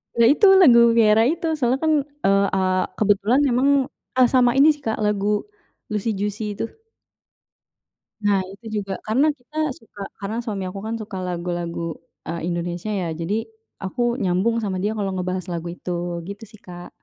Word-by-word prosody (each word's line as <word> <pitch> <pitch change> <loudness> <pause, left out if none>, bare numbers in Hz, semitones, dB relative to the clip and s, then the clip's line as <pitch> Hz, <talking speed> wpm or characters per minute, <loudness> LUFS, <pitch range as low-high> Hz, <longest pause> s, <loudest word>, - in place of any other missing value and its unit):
Ya, 235 - +5
itu 405 +8 +4 0.2
lagu 245 -9 +8 0.2
Vierra 220 -1 +5
itu. 330 +2 -1
Soalnya 255 0 +1
kan, 315 -1 +3 0.3
eee 195 0 +4
eee, 185 -1 +1 0.2
kebetulan 210 +5 +3
memang, 255 +2 +2 0.5
eee, 255 -1 +6
sama 245 -2 +5
ini 285 +3 +7
sih, 290 - -17
Kak, 220 - -1
lagu 210 0 +1 0.5
Luicy 215 +2 -1
Juicy 210 +1 -2
itu. - - -2 1.6
Nah, 200 -2 +3
itu 215 +1 -5
juga 195 -1 -5
karena 265 +8 +3
kita 305 +2 -3
suka 215 -3 -14 0.2
karena 215 +4 -4
suami 200 -5 -4
aku 185 +2 -6
kan 220 +2 -4
suka 215 -3 -7
lagu-lagu, 175 -2 -3 0.3
eee, 170 +1 -4
Indonesia, 175 +3 -3
ya. 190 -5 -1
Jadi 180 +7 -2 0.3
aku 195 +6 -4 0.2
nyambung 195 +3 +1
sama 190 -4 -2
dia 215 +2 -1
kalau 195 -2 -2
ngebahas 185 -1 -3
lagu 170 0 -4
itu, 180 +1 -5 0.3
gitu 200 +4 -8
sih, 215 - -15
Kak. 175 -2 -11
205 Hz, 165 wpm, -22 LUFS, 185-235 Hz, 1.6 s, lagu